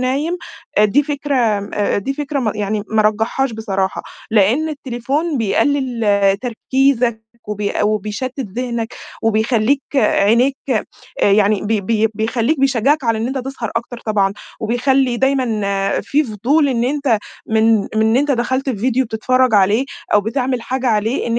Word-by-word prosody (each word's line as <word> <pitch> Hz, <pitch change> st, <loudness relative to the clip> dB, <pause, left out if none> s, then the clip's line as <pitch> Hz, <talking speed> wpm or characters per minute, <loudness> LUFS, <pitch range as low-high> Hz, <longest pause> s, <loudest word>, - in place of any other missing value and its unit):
نايم 280 Hz, +7 st, 0 dB, 0.4 s
آآ 210 Hz, -, +6 dB
دي 235 Hz, +8 st, +3 dB
فكرة 290 Hz, -1 st, -2 dB
آمم، 210 Hz, -5 st, 0 dB
أ 205 Hz, -1 st, 0 dB
دي 270 Hz, +7 st, -2 dB
فكرة 290 Hz, 0 st, -3 dB
م 220 Hz, -5 st, 0 dB
يعني 210 Hz, 0 st, -2 dB
ما 220 Hz, 0 st, +2 dB
أرجحهاش 225 Hz, +5 st, 0 dB
بصراحة، 195 Hz, -4 st, -2 dB, 0.3 s
لأن 225 Hz, +9 st, +3 dB
التليفون 280 Hz, +2 st, -2 dB
بيقلل 225 Hz, -4 st, +1 dB
تركيزك 245 Hz, -1 st, 0 dB, 0.3 s
وبيق 210 Hz, 0 st, -1 dB
وبيشتت 215 Hz, +5 st, -3 dB, 0.2 s
ذهنك 235 Hz, -2 st, -3 dB, 0.3 s
وبيخلّيك 225 Hz, +4 st, +2 dB
عينيك 245 Hz, +2 st, +3 dB
آآ 215 Hz, -3 st, -1 dB
يعني 205 Hz, 0 st, +3 dB
بي 215 Hz, 0 st, 0 dB
بي 220 Hz, +2 st, +1 dB
بيخلّيك 230 Hz, +6 st, 0 dB
بيشجعك 275 Hz, +2 st, +2 dB
على 230 Hz, -2 st, +1 dB
إن 225 Hz, -, -1 dB
أنت 265 Hz, +2 st, -2 dB
تسهر 255 Hz, -3 st, -5 dB
أكتر 235 Hz, +1 st, -4 dB
طبعًا، 200 Hz, -3 st, +2 dB, 0.3 s
وبيخلّي 250 Hz, +2 st, +1 dB
دايمًا 220 Hz, -7 st, 0 dB
في 300 Hz, +2 st, +1 dB
فضول 270 Hz, +7 st, +1 dB
إن 235 Hz, -2 st, 0 dB
أنت 265 Hz, -4 st, +1 dB, 0.3 s
من 220 Hz, 0 st, +3 dB
من -, -, -6 dB
إن 220 Hz, +1 st, +3 dB
أنت 285 Hz, +2 st, +1 dB
دخلت 260 Hz, +1 st, 0 dB
في 245 Hz, -, -3 dB
فيديو 255 Hz, +5 st, +1 dB
بتتفرج 255 Hz, +2 st, +1 dB
عليه 205 Hz, +5 st, +3 dB, 0.3 s
أو 205 Hz, -, +6 dB
بتعمل 250 Hz, +3 st, -2 dB
حاجة 260 Hz, +1 st, -3 dB
عليه، 220 Hz, +1 st, 0 dB
إن 235 Hz, 0 st, 0 dB
235 Hz, 150 wpm, -18 LUFS, 215-265 Hz, 0.4 s, آآ